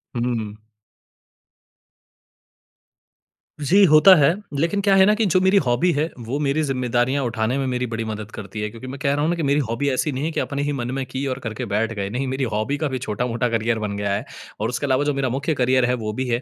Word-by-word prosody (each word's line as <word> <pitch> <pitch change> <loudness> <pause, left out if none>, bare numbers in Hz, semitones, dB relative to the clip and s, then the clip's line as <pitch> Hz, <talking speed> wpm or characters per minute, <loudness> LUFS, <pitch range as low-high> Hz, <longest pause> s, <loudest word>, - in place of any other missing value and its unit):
हुँ, 120 - -1
हुँ। 110 -3 -4 2.9
जी, 190 +8 +4
होता 155 +5 +8
है। 145 -1 +4 0.3
लेकिन 170 +6 +1
क्या 200 -1 +3
है 190 0 +6
ना 210 - +4
कि 220 0 +1
जो 185 -1 +3
मेरी 190 +2 +4
हॉबी 120 +9 +2
है, 150 -1 0 0.2
वो 120 +4 -4
मेरी 145 +1 0
ज़िम्मेदारियाँ 130 0 0
उठाने 115 +1 -1
में 135 - -1
मेरी 125 0 -1
बड़ी 115 0 -3
मदद 110 0 -6
करती 105 +1 -7
है 105 - -2
क्योंकि 115 +4 -10
मैं 135 +1 -7
कह 140 0 +1
रहा 145 - -1
हूँ 155 - +1
ना 175 - +1
कि 165 - -3
मेरी 140 +1 +2
हॉबी 120 +5 0
ऐसी 140 +3 0
नहीं 135 +3 -3
है 165 - -1
कि - - -2
अपने 140 0 -2
ही 145 - -1
मन 125 -2 -3
में 135 - -2
की 130 +2 -4
और 130 0 -3
करके 110 -2 -4
बैठ 110 +2 -1
गए। 100 -2 -3
नहीं, 125 +5 -3
मेरी 130 +1 -2
हॉबी 110 +7 -1
का 155 0 -1
भी 130 - -3
छोटा-मोटा 120 +2 -2
करियर 115 0 0
बन 105 -2 -3
गया 100 -1 -1
है 100 - -2 0.3
और 110 +2 -1
उसके 125 +4 -2
अलावा 130 +1 +2
जो 145 0 0
मेरा 135 -2 -1
मुख्य 140 +6 -1
करियर 130 -2 +2
है, 125 - +1
वो 110 -3 -3
भी 130 +3 -3
है 120 0 0
130 Hz, 245 wpm, -22 LUFS, 115-145 Hz, 2.9 s, होता